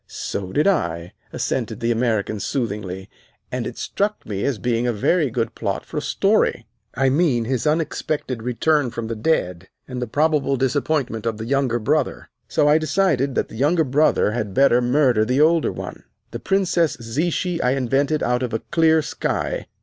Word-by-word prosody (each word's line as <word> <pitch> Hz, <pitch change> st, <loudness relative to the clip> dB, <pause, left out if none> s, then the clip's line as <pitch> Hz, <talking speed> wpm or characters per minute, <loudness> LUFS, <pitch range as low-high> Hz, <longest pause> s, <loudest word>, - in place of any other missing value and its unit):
"So 95 Hz, -2 st, -5 dB
did 150 Hz, -, +1 dB
I," 85 Hz, -, 0 dB, 0.2 s
assented 115 Hz, -3 st, -2 dB
the 115 Hz, 0 st, 0 dB
American 110 Hz, -3 st, 0 dB
soothingly; 100 Hz, -5 st, -3 dB, 0.4 s
"and -, -, -2 dB
it -, -, -8 dB
struck 210 Hz, +1 st, -2 dB
me 100 Hz, -2 st, -4 dB
as 140 Hz, -5 st, 0 dB
being 120 Hz, +3 st, 0 dB
a -, -, +2 dB
very 145 Hz, -, +1 dB
good 115 Hz, -1 st, -2 dB
plot -, -, -3 dB
for -, -, -7 dB
a -, -, 0 dB
story. -, -, +1 dB, 0.3 s
I 135 Hz, 0 st, +2 dB
mean 135 Hz, -5 st, +2 dB
his 130 Hz, +4 st, -1 dB
unexpected 150 Hz, -5 st, -1 dB
return 130 Hz, +4 st, +1 dB
from 115 Hz, -1 st, -5 dB
the 115 Hz, -, -2 dB
dead, 95 Hz, -, -1 dB, 0.2 s
and 125 Hz, -1 st, -5 dB
the 125 Hz, -, -2 dB
probable 145 Hz, +1 st, +1 dB
disappointment 135 Hz, -3 st, -1 dB
of 110 Hz, -2 st, -1 dB
the 110 Hz, -, -5 dB
younger 135 Hz, -2 st, +1 dB
brother. 140 Hz, +4 st, -1 dB, 0.2 s
So 145 Hz, -, +2 dB
I 150 Hz, +2 st, +5 dB
decided 150 Hz, -5 st, +1 dB
that -, -, 0 dB
the -, -, -11 dB
younger 155 Hz, +7 st, +2 dB
brother 140 Hz, -5 st, +2 dB
had 105 Hz, -4 st, -3 dB
better 135 Hz, -3 st, +5 dB
murder 125 Hz, -3 st, +3 dB
the 125 Hz, +5 st, 0 dB
older 160 Hz, +1 st, +3 dB
one. -, -, -8 dB, 0.3 s
The -, -, -5 dB
Princess 180 Hz, -6 st, +1 dB
Zichy 165 Hz, -, -1 dB
I 125 Hz, -, +2 dB
invented 135 Hz, +3 st, 0 dB
out 125 Hz, +1 st, +1 dB
of 125 Hz, -3 st, -3 dB
a -, -, 0 dB
clear 160 Hz, -1 st, +4 dB
sky. -, -, -3 dB
130 Hz, 180 wpm, -22 LUFS, 115-150 Hz, 0.4 s, I